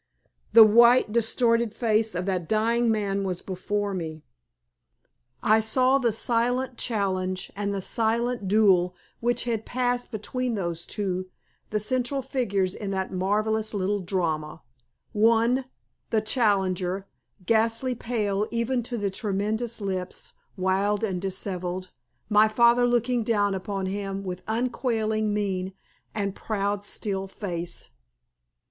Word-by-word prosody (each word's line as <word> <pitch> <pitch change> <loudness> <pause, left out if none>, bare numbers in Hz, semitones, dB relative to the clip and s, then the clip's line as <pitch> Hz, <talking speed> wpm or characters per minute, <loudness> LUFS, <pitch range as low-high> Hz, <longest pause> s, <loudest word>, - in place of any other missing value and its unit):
The 230 - +11
white, 235 +2 +6
distorted 230 0 +1
face 220 -3 +1
of 180 +1 -2
that 185 -4 -2
dying 230 +2 +2
man 200 -2 0
was 185 -2 -3
before 200 +2 -2
me. 160 -4 -5 1.2
I 215 +1 +5
saw 255 +5 +3
the 240 -3 +2
silent 245 +3 0
challenge 185 -4 -1
and 200 0 -2
the 200 -1 -2
silent 230 +1 0
duel 185 -3 +4 0.2
which 240 0 0
had 230 -3 -2
passed 245 0 -1
between 245 +2 -3
those 170 -4 -3
two, 185 -3 -2 0.4
the 210 - 0
central 255 +4 0
figures 200 -9 0
in 200 -1 -5
that 190 -1 -2
marvellous 215 +3 0
little 200 +1 0
drama 165 -5 -2 0.5
one, 230 +4 +3 0.4
the 220 - +2
challenger, 195 -5 0 0.4
ghastly 230 +4 +2
pale 215 -4 -1
even 235 +2 0
to 240 +1 -4
the 205 -2 -1
tremulous 215 +4 -1
lips, 185 -2 -3 0.2
wild 195 +3 +1
and 190 -5 -1
dishevelled, 185 -1 -3 0.4
my 215 0 +5
father 235 +2 +4
looking 240 0 +1
down 205 -3 +1
upon 195 0 -3
him 195 0 -3
with 185 -1 -5
unquailing 220 -2 0
mien 190 -2 -2 0.4
and 200 -2 -1
proud, 205 -1 -2
still 195 -2 -3
face. 175 -4 -5
210 Hz, 125 wpm, -26 LUFS, 190-230 Hz, 1.2 s, The